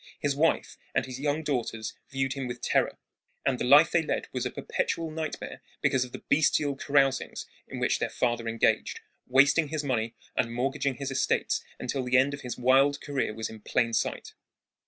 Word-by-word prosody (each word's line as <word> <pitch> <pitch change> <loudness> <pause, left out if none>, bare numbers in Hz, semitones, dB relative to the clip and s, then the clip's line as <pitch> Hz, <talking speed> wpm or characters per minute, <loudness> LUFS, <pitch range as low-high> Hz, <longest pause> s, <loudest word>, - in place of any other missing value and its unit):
His 145 -1 0
wife 160 +3 +1 0.2
and - - +2
his 130 0 -7
young 145 +2 0
daughters 120 -6 -2 0.2
viewed 135 -1 -1
him 135 -2 -4
with 125 0 -5
terror, - - +1 0.5
and 130 -2 +1
the - - -1
life 145 +6 +7
they 170 - +3
led 160 - -2
was 125 -1 -1
a - - -4
perpetual 165 +5 -2
nightmare 155 -1 -5 0.2
because 130 -1 +2
of 125 - -9
the - - -9
bestial 145 -1 +2
carousings 135 -1 +1 0.2
in - - -7
which - - +1
their - - -1
father 120 -1 -1
engaged, 115 0 +1 0.3
wasting 140 +5 +5
his 155 0 -3
money 115 -5 -1 0.2
and 115 - 0
mortgaging 135 +2 0
his 140 0 -4
estates 130 -1 0
until 130 +1 -2
the 125 +1 +3
end 135 +2 +3
of 140 - -6
his 125 - -5
wild 135 +3 +4
career 140 -6 -2
was 110 0 -4
in 110 - -10
plain 115 +2 0
sight. - - -2
135 Hz, 190 wpm, -28 LUFS, 125-145 Hz, 0.5 s, life